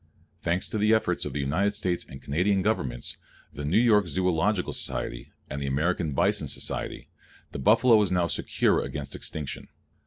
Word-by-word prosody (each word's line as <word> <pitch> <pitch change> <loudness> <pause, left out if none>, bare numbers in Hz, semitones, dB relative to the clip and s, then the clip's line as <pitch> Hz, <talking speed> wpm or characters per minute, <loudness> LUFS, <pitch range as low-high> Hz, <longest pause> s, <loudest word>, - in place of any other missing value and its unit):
Thanks 85 +2 0
to 110 - -1
the 105 +2 +4
efforts 110 - 0
of - - -4
the 75 - -2
United 95 +10 0
States 90 -4 -1
and 65 - -10
Canadian 95 +7 +1
Governments, 65 - -2 0.4
the 75 - -6
New 80 +8 +2
York 110 -5 +4
Zoological 90 +2 0
Society - - -3 0.2
and 70 - -5
the 70 - -2
American 75 +2 0
Bison - - +1
Society, - - -3 0.4
the - - -5
buffalo 110 - +5
now 90 -2 +1
is 80 - -1
secure - - +1
against 70 -1 -5
extinction. 75 -3 -5
90 Hz, 165 wpm, -27 LUFS, 70-105 Hz, 0.4 s, buffalo